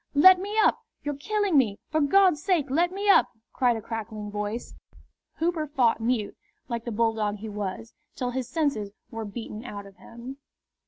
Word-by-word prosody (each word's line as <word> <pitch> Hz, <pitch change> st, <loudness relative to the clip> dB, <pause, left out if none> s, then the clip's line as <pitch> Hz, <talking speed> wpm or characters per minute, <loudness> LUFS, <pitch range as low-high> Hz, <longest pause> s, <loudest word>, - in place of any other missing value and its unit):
"Let 365 Hz, +5 st, +8 dB
me 410 Hz, +3 st, -4 dB
up! 440 Hz, +1 st, +4 dB, 0.2 s
You're 290 Hz, -, -2 dB
killing 390 Hz, +3 st, +1 dB
me! 210 Hz, -6 st, +1 dB
For 310 Hz, 0 st, +2 dB
God's 360 Hz, +1 st, +4 dB
sake 315 Hz, -7 st, +1 dB
let 345 Hz, +5 st, +2 dB
me 400 Hz, +2 st, -3 dB
up!" 400 Hz, -, +6 dB, 0.3 s
cried 245 Hz, -3 st, +2 dB
a 220 Hz, -, -8 dB
crackling 215 Hz, -2 st, -5 dB
voice. 210 Hz, +3 st, -4 dB, 0.6 s
Hooper 325 Hz, -2 st, -1 dB
fought 245 Hz, -6 st, +2 dB
mute, 225 Hz, -3 st, 0 dB, 0.3 s
like 235 Hz, -1 st, -4 dB
the 235 Hz, -, -3 dB
bulldog 220 Hz, -2 st, +1 dB
he 215 Hz, +1 st, -7 dB
was, 210 Hz, +2 st, -5 dB, 0.2 s
till 250 Hz, -2 st, -2 dB
his 255 Hz, -1 st, -3 dB
senses 275 Hz, -9 st, -1 dB, 0.2 s
were 225 Hz, -1 st, -5 dB
beaten 215 Hz, +1 st, -7 dB
out 205 Hz, -5 st, -7 dB
of 195 Hz, -1 st, -15 dB
him. 235 Hz, +6 st, -10 dB
245 Hz, 175 wpm, -26 LUFS, 215-310 Hz, 0.6 s, Let